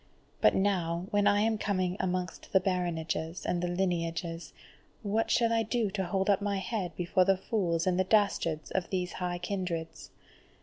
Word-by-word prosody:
But 105 - +5
now 180 -3 0
when 205 0 +3
I 205 0 +4
am 220 0 +1
coming 185 -3 0
amongst 180 -2 -3
the 190 - +7
baronages 170 -2 -2
and 175 - 0
the 175 - 0
lineages, 170 -2 -2 0.5
what 220 +2 0
shall 230 -1 +3
I 225 - +3
do 225 -1 0
to 190 -1 -2
hold 190 +2 -1
up 200 -1 +3
my 200 -1 0
head 190 -1 -3
before 185 +1 +2
the 195 0 +3
fools 175 -5 0
and 185 -1 +1
the - - +4
dastards 185 -7 +1
of 190 -2 -1
these 180 -2 -2
high 175 -1 -1
kindreds? 175 -3 -4
185 Hz, 175 wpm, -30 LUFS, 175-200 Hz, 0.5 s, the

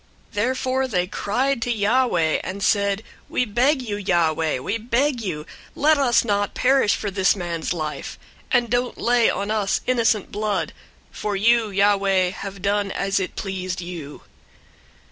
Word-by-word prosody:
001:014 - - -30
Therefore 260 +4 0
they 180 -7 0
cried 245 +7 -1
to 245 - -1
Yahweh, 205 -7 +2
and 195 +2 -5
said, 200 0 +1 0.3
"We 250 - +1
beg 255 +5 +2
you, 210 -4 -3
Yahweh, 165 -6 +1
we 200 - -3
beg 245 +3 0
you, 160 -8 -4 0.3
let 305 +1 +3
us 245 -4 +3
not 205 -2 0
perish 260 -4 +3
for 205 - -4
this 190 +1 +3
man's 170 -3 -3
life, 155 -4 -4 0.3
and 245 -2 +3
don't 245 +2 -1
lay 240 -1 +3
on 200 +2 -2
us 210 -3 0
innocent 230 -4 +1
blood; 210 0 -2 0.4
for 210 -1 -3
you, 225 +2 +3
Yahweh, 195 -2 +2
have 195 0 -8
done 200 0 +1
as 195 0 -1
it 185 - -4
pleased 185 -2 -4
you." 170 -5 -8
205 Hz, 155 wpm, -22 LUFS, 190-240 Hz, 0.4 s, let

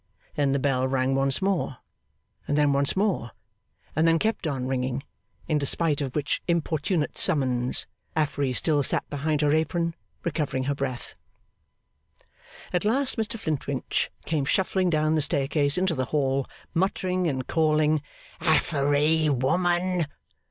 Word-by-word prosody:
Then 145 -2 +1
the 140 - +2
bell 130 -2 +1
rang 130 0 +1
once 135 +5 +2
more, 190 -8 0 0.7
and 145 - +1
then 145 -1 +4
once 140 0 +2
more, 190 - 0 0.6
and 160 +1 +3
then 165 0 +5
kept 220 -2 -1
on 135 -4 -2
ringing; 130 0 -2 0.4
in 155 -2 +1
despite 150 +1 0
of 135 -3 -4
which 150 -2 -1
importunate 165 -1 0
summons, 130 -7 +1 0.3
Affery 145 -3 0
still 150 +2 +2
sat 135 - 0
behind 150 +1 0
her 145 0 +3
apron, 165 +2 0 0.3
recovering 150 -5 -1
her 140 +2 0
breath. 135 -3 -4 1.6
At 180 - +1
last 260 +5 +2
Mr 225 0 -2
Flintwinch 140 -7 -2 0.2
came 155 -3 0
shuffling 185 +3 +1
down 155 -1 +2
the 155 - +2
staircase 145 +1 +1
into 185 -1 +1
the 130 -4 -1
hall, 135 -2 0 0.3
muttering 185 0 0
and 130 -4 -2
calling 155 -1 +2 0.4
'Affery 155 -1 +2
woman! 175 +5 +1
150 Hz, 140 wpm, -26 LUFS, 135-170 Hz, 1.6 s, then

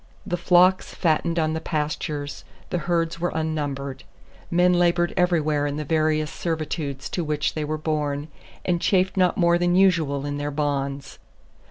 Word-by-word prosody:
The 180 -3 -1
flocks 180 +1 +3
fattened 165 0 +1
on 155 -1 +1
the 160 - -3
pastures, 150 -2 -3 0.3
the 180 - 0
herds 165 -1 0
were 175 +1 0
unnumbered. 145 -4 -3 0.5
Men 180 +1 +4
labored 175 0 +2
everywhere 155 -5 +2
in 145 - -3
the 150 - -3
various 155 0 +1
servitudes 155 -4 -3
to 175 - -1
which 150 -2 -1
they 155 - -2
were 155 +1 -2
born, 150 -2 -2 0.4
and 175 -2 +1
chafed 185 -1 +2
not 180 -2 +2
more 170 -1 +3
than 175 0 +2
usual 160 -7 +3
in 145 0 -3
their 145 0 -2
bonds. 140 -2 -3
155 Hz, 160 wpm, -24 LUFS, 145-175 Hz, 0.5 s, Men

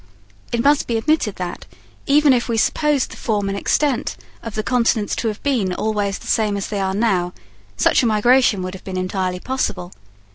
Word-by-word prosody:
It 235 0 0
must 290 0 +3
be 230 - 0
admitted 235 -4 +1
that, 180 -1 -6 0.4
even 290 0 +5
if 245 -1 0
we 230 - 0
supposed 295 +3 +1
the - - -10
form 205 -3 -1
and 195 - -2
extent 270 +5 0 0.2
of 230 -2 -7
the 215 - -1
continents 230 -3 +1
to 230 - -1
have 215 -1 -4
been 225 -10 0
always 205 -2 -1
the - - -14
same 210 -2 +1
as 195 - -4
they 205 - -2
are 190 0 -1
now, 190 -5 +1 0.4
such - - +3
a 245 - +2
migration 220 -2 +3
would 185 0 -5
have 190 - -10
been 190 -1 -5
entirely 185 0 -2
possible. 185 -7 -3
215 Hz, 195 wpm, -20 LUFS, 195-250 Hz, 0.4 s, even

